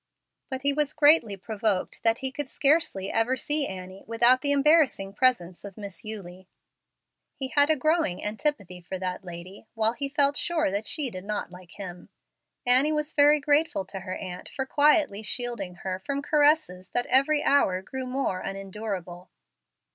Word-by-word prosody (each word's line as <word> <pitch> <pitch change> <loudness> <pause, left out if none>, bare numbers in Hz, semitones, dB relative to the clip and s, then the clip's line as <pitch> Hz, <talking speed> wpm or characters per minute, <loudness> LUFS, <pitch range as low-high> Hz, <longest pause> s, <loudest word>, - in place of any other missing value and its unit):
But 260 0 -5
he 280 0 +3
was 300 0 -1
greatly 295 -9 +4
provoked 210 -1 -2
that 225 0 +2
he 265 - +1
could 285 -1 -5
scarcely 275 - +1
ever 235 +4 +1
see 295 +3 0
Annie 185 0 -8
without 240 +3 +4
the 285 - +1
embarrassing 285 -9 +3
presence 200 -7 0
of 200 -2 -10
Miss 200 -3 -8
Eulie. 190 -4 -7 0.9
He 265 -1 -4
had 285 +2 +4
a 315 - +4
growing 310 - 0
antipathy 210 - -2
for 185 +2 -6
that 185 +1 -4
lady, 180 +4 -10
while 225 0 +2
he 275 +3 -4
felt 285 0 +2
sure 325 - +1
that 205 +2 -2
she 290 -6 0
did 185 -2 -7
not 210 -3 -4
like 180 -1 -13
him. 180 -3 -9 0.6
Annie 255 +5 +4
was 300 0 -2
very 295 +1 +5
grateful 295 -7 +1
to 195 +1 -6
her 185 0 -6
aunt 180 -1 -8
for 265 -2 -4
quietly 290 - +3
shielding 235 -4 -2
her 185 -1 -2
from 280 +8 -4
caresses 290 - +2
that 245 - +1
every 285 +3 +2
hour 190 -10 +2
grew 260 +5 -6
more 250 -7 -2
unendurable. 195 -2 -6
230 Hz, 170 wpm, -26 LUFS, 190-285 Hz, 0.9 s, very